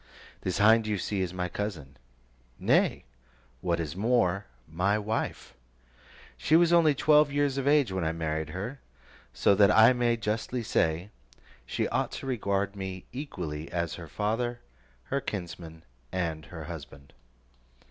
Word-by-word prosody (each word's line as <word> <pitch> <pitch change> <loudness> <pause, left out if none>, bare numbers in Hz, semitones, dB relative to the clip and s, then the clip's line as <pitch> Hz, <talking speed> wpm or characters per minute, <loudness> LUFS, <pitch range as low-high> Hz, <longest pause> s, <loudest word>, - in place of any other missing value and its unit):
This 90 - -2
hind 110 +1 +5
you 105 -1 0
see 95 +1 -2
is 90 -2 -1
my 90 -1 -2
cousin; 85 -8 -5 0.6
nay, - - +2 0.6
what 85 -1 0
is 80 -2 -4
more, 100 -3 +1 0.2
my 90 +7 +1
wife. 110 +2 -3 0.8
She 155 - +2
was 170 0 +5
only 160 -4 +5
twelve 150 0 +4
years 145 -1 +1
of 135 - -2
age 145 -7 +4
when 95 -2 -2
I 80 - +1
married 80 -1 -3
her, 100 - -5 0.5
so - - +3
that 100 0 +5
I 110 +3 +7
may 120 -1 +1
justly 115 +3 -2
say, 85 -1 0 0.6
she - - -1
ought - - 0
to - - -6
regard 100 -5 -1
me 95 -2 -6
equally 85 - -5
as 85 -2 -2
her 85 -2 -8
father, 115 +7 -2 0.4
her 140 - -2
kinsman, 85 -6 -6 0.3
and 80 -4 -2
her 80 -1 -8
husband. 70 -3 -10
100 Hz, 145 wpm, -28 LUFS, 85-120 Hz, 0.8 s, I